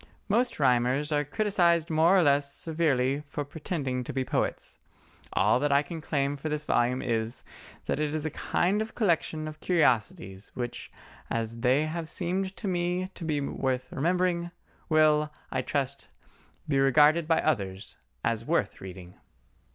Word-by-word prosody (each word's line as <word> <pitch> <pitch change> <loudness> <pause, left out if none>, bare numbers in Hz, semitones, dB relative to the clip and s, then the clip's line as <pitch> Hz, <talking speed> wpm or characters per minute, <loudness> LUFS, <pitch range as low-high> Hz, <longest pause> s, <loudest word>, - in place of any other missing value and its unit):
Most 235 +1 +1
rhymers 130 +2 +2
are 150 0 +2
criticised 170 -1 +2
more 165 +4 +5
or 180 - +5
less 140 -1 +2
severely 145 -4 0
for 145 0 -4
pretending 145 -4 -3
to - - -5
be 130 -1 -2
poets; - - -2 0.5
all - - +3
that 145 +1 +1
I 140 +1 +4
can 165 +1 -7
claim 145 -2 -1
for 155 +3 -4
this 150 0 -2
volume 125 0 +1
is, 115 0 -1 0.4
that - - -1
it 150 0 -1
is 155 0 -2
a 155 - -1
kind 195 +7 0
of 220 - -5
collection 165 -6 0
of 155 0 -8
curiosities 105 - 0
which, 120 -1 -5 0.4
as 115 0 -3
they 130 +5 +3
have 160 0 -4
seemed 190 +3 -1
to 210 - -4
me 180 +1 -1
to - - -9
be 155 -2 0
worth 130 -2 -2
remembering, 175 +2 0 0.4
will, 155 -1 +4 0.2
I 130 - 0
trust, 140 0 -3 0.6
be 140 -2 +2
regarded 150 +4 +5
by 165 -1 +3
others 100 -9 -2 0.3
as - - 0
worth - - -1
reading. 90 -1 -9
150 Hz, 160 wpm, -28 LUFS, 130-170 Hz, 0.6 s, more